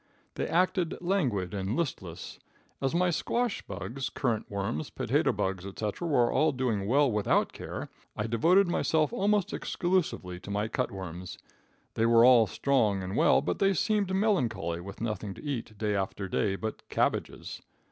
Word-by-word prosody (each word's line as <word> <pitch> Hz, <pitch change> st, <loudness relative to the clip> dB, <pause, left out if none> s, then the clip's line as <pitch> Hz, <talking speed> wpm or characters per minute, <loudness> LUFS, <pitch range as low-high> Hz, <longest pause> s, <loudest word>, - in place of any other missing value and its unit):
They -, -, -2 dB
acted 180 Hz, 0 st, +1 dB
languid 130 Hz, -, 0 dB
and 100 Hz, +2 st, -2 dB
listless. 95 Hz, -, -4 dB, 0.4 s
As 135 Hz, +3 st, 0 dB
my 180 Hz, 0 st, +3 dB
squash 235 Hz, +7 st, -1 dB
bugs, 120 Hz, +7 st, -5 dB
currant 115 Hz, -5 st, -2 dB
worms, 100 Hz, -7 st, -3 dB
potato -, -, +1 dB
bugs, 95 Hz, -1 st, -2 dB
etc., 105 Hz, -, -4 dB
were 125 Hz, -6 st, +3 dB
all 155 Hz, 0 st, +3 dB
doing 115 Hz, -7 st, -1 dB
well 140 Hz, +3 st, +4 dB
without 105 Hz, -1 st, +1 dB
care, -, -, -6 dB, 0.3 s
I 105 Hz, -, -1 dB
devoted 170 Hz, -, +4 dB
myself 160 Hz, +1 st, +1 dB
almost 205 Hz, -3 st, +1 dB
exclusively 170 Hz, -, -1 dB
to 100 Hz, -, -11 dB
my 105 Hz, +1 st, -1 dB
cut -, -, -1 dB
worms. 90 Hz, -2 st, -7 dB, 0.6 s
They 115 Hz, -, +2 dB
were 115 Hz, 0 st, +6 dB
all 120 Hz, -3 st, +7 dB
strong 110 Hz, -5 st, +1 dB
and 95 Hz, +2 st, -4 dB
well, -, -, +4 dB
but -, -, -2 dB
they 195 Hz, -1 st, +3 dB
seemed 205 Hz, +1 st, +1 dB
melancholy 130 Hz, -, 0 dB
with 100 Hz, +3 st, -9 dB
nothing 105 Hz, -3 st, -3 dB
to -, -, -12 dB
eat, 120 Hz, -7 st, -4 dB
day 105 Hz, -1 st, 0 dB
after 95 Hz, 0 st, -2 dB
day, 95 Hz, +1 st, 0 dB
but 110 Hz, +2 st, -5 dB
cabbages. -, -, -1 dB
115 Hz, 160 wpm, -29 LUFS, -, 0.6 s, all